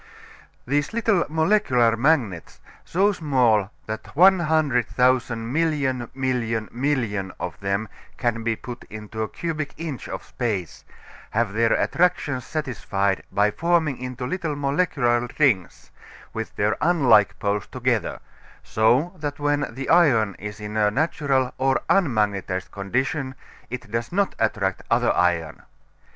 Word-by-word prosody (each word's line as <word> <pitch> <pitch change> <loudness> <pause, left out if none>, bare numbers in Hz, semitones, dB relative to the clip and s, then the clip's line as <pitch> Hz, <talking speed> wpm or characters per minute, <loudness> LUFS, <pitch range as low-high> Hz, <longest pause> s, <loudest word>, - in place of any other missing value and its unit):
These 145 - 0
little 220 -6 +2
molecular 160 - +3
magnets, 120 - 0 0.2
so 195 +4 +2
small 125 - +2 0.2
that 110 +5 -7
100,000 130 - +3
million 140 -7 0
million 120 -4 -1
million 115 -8 -1
of 90 -2 -5
them 100 +2 -1 0.3
can 120 -2 -1
be 115 0 0
put 120 +1 -9
into 110 +1 -7
a 110 - -2
cubic 155 -3 -4
inch 155 -5 -6
of - - -5
space, 100 - -4 0.5
have 110 -2 0
their 115 +1 +3
attractions 145 -7 +1
satisfied 105 - -1
by 105 +1 +2
forming 165 -2 +1
into 125 0 -5
little 160 +1 -2
molecular 140 -5 +1
rings, 120 - +1 0.4
with 110 0 -5
their 105 +1 +1
unlike 130 - +4
poles 100 -2 -1
together, - - -1 0.4
so 125 - +2
that 145 -2 -4
when 145 -1 0
the 130 +3 -6
iron 125 - +4
is 105 +1 -7
in 105 +1 -5
a 105 -1 +4
natural 135 0 0
or 135 -1 +2
unmagnetized 105 - +1
condition 130 +7 -2 0.3
it 125 -4 -7
does 115 +1 -2
not 200 +2 +1
attract 100 -4 0
other - - +3
iron. 85 -3 0
125 Hz, 125 wpm, -23 LUFS, 110-150 Hz, 0.5 s, unlike